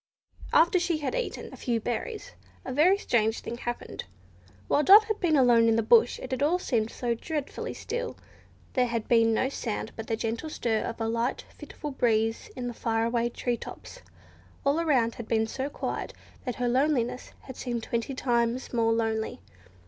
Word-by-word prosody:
After 340 Hz, +3 st, +5 dB
she 345 Hz, -2 st, 0 dB
had 300 Hz, +6 st, -3 dB
eaten -, -, -4 dB
a -, -, -9 dB
few 235 Hz, -2 st, -1 dB
berries 245 Hz, -, -4 dB, 0.3 s
a 255 Hz, -, -4 dB
very 345 Hz, +8 st, +5 dB
strange 225 Hz, -, +1 dB
thing 235 Hz, -, -6 dB
happened. 240 Hz, 0 st, -5 dB, 0.6 s
While -, -, +3 dB
Dot 405 Hz, +7 st, +9 dB
had 435 Hz, -1 st, -3 dB
been 335 Hz, -4 st, +2 dB
alone 240 Hz, -4 st, +5 dB
in 225 Hz, -, +3 dB
the 230 Hz, -, +2 dB
bush 230 Hz, +2 st, +5 dB
it 260 Hz, -, -8 dB
had 260 Hz, -, -2 dB
all 310 Hz, +5 st, +3 dB
seemed 230 Hz, -11 st, 0 dB
so 240 Hz, 0 st, -2 dB
dreadfully 295 Hz, +4 st, -4 dB
still. 485 Hz, 0 st, -4 dB, 0.6 s
There 250 Hz, -2 st, +2 dB
had 230 Hz, -2 st, -3 dB
been 230 Hz, -1 st, +4 dB
no 225 Hz, +3 st, +2 dB
sound 225 Hz, -5 st, -4 dB
but 225 Hz, -, -7 dB
the 225 Hz, -, 0 dB
gentle 230 Hz, +8 st, -3 dB
stir 225 Hz, -7 st, 0 dB
of 230 Hz, -, -5 dB
a 225 Hz, -, -1 dB
light, 230 Hz, +2 st, -1 dB
fitful 295 Hz, -, -7 dB
breeze 225 Hz, -3 st, +1 dB
in 250 Hz, -1 st, -4 dB
the 240 Hz, -, -4 dB
far 225 Hz, 0 st, 0 dB
away 235 Hz, 0 st, +1 dB
tree 240 Hz, 0 st, -2 dB
tops. -, -, -10 dB, 0.6 s
All 280 Hz, +3 st, +3 dB
around 260 Hz, -9 st, +2 dB
had 235 Hz, -, -8 dB
been 220 Hz, -1 st, +2 dB
so 265 Hz, +5 st, -4 dB
quiet, -, -, -4 dB, 0.3 s
that 250 Hz, -, -2 dB
her 245 Hz, -, -1 dB
loneliness 255 Hz, -1 st, 0 dB
had 260 Hz, -, -10 dB
seemed 240 Hz, -3 st, -3 dB
twenty 235 Hz, +4 st, -2 dB
times 240 Hz, 0 st, 0 dB
more 225 Hz, -1 st, +2 dB
lonely. 220 Hz, -1 st, -1 dB
240 Hz, 185 wpm, -28 LUFS, 230-285 Hz, 0.6 s, Dot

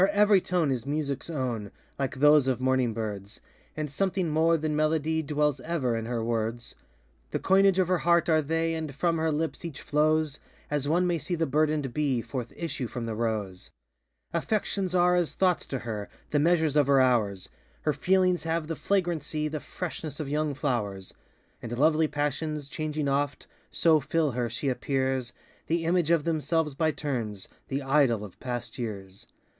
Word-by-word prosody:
Her 190 Hz, -, +6 dB
every 205 Hz, -1 st, +5 dB
tone 175 Hz, -6 st, +1 dB
is 125 Hz, -3 st, -2 dB
musicŌĆÖs 140 Hz, 0 st, -2 dB
own, 120 Hz, -7 st, -2 dB, 0.3 s
Like 135 Hz, -1 st, -1 dB
those 145 Hz, 0 st, +5 dB
of 130 Hz, -2 st, +1 dB
morning 130 Hz, -2 st, +2 dB
birds, 105 Hz, -2 st, -5 dB, 0.4 s
And 150 Hz, -2 st, -3 dB
something 185 Hz, +2 st, 0 dB
more 165 Hz, +2 st, +3 dB
than 155 Hz, -1 st, -2 dB
melody 155 Hz, +1 st, +1 dB
Dwells 150 Hz, -2 st, 0 dB
ever 130 Hz, -5 st, -1 dB
in 115 Hz, 0 st, -3 dB
her 120 Hz, -2 st, -2 dB
words; 115 Hz, +1 st, -2 dB, 0.6 s
The -, -, -1 dB
coinage 195 Hz, 0 st, +4 dB
of 185 Hz, -2 st, +3 dB
her 185 Hz, -1 st, +2 dB
heart 170 Hz, 0 st, +3 dB
are 160 Hz, -2 st, +4 dB
they, 165 Hz, +2 st, 0 dB
And 160 Hz, -4 st, -4 dB
from 165 Hz, +2 st, +1 dB
her 160 Hz, 0 st, +1 dB
lips 160 Hz, +3 st, -2 dB
each 165 Hz, -5 st, -6 dB
flows 155 Hz, 0 st, +1 dB, 0.3 s
As 145 Hz, -1 st, 0 dB
one 175 Hz, +4 st, +2 dB
may 175 Hz, -2 st, +1 dB
see 175 Hz, -, -3 dB
the 165 Hz, -1 st, 0 dB
burdenŌĆÖd 150 Hz, -2 st, +1 dB
bee 140 Hz, -5 st, +1 dB
Forth 120 Hz, 0 st, -5 dB
issue 160 Hz, -7 st, -3 dB
from 120 Hz, 0 st, -5 dB
the 115 Hz, -, -3 dB
rose. 105 Hz, -5 st, -3 dB, 0.6 s
Affections 190 Hz, +1 st, -1 dB
are 180 Hz, 0 st, +4 dB
as 175 Hz, -3 st, 0 dB
thoughts 185 Hz, -2 st, +1 dB
to 135 Hz, -, -2 dB
her, 110 Hz, -4 st, -5 dB, 0.2 s
The 145 Hz, -, +3 dB
measures 160 Hz, -1 st, +3 dB
of 145 Hz, -3 st, +4 dB
her 140 Hz, -1 st, +5 dB
hours; 110 Hz, -7 st, +2 dB, 0.3 s
Her 150 Hz, -, +2 dB
feelings 180 Hz, +3 st, +2 dB
have 165 Hz, 0 st, -1 dB
the 165 Hz, +1 st, -3 dB
flagrancy, 165 Hz, -6 st, -1 dB
The 155 Hz, 0 st, -3 dB
freshness 160 Hz, -3 st, -6 dB
of 150 Hz, -, -3 dB
young 150 Hz, 0 st, -1 dB
flowers; 105 Hz, -9 st, -2 dB, 0.5 s
And 120 Hz, 0 st, -5 dB
lovely 155 Hz, +3 st, +4 dB
passions, 150 Hz, 0 st, -2 dB
changing 155 Hz, -1 st, -2 dB
oft, 140 Hz, +1 st, -1 dB, 0.2 s
So 160 Hz, -2 st, +4 dB
fill 155 Hz, +1 st, 0 dB
her, 120 Hz, -1 st, -1 dB
she 120 Hz, +5 st, -3 dB
appears 130 Hz, -1 st, -1 dB, 0.3 s
The 165 Hz, 0 st, 0 dB
image 170 Hz, -1 st, +2 dB
of 170 Hz, -3 st, +3 dB
themselves 160 Hz, -1 st, 0 dB
by 160 Hz, +3 st, +1 dB
turns, 120 Hz, -10 st, -3 dB
ŌĆö -, -, -23 dB, 0.2 s
The 135 Hz, +1 st, -2 dB
idol 135 Hz, -6 st, +2 dB
of 95 Hz, -, -14 dB
past 120 Hz, 0 st, -5 dB
years! 100 Hz, -4 st, -6 dB
150 Hz, 180 wpm, -28 LUFS, 125-165 Hz, 0.6 s, Her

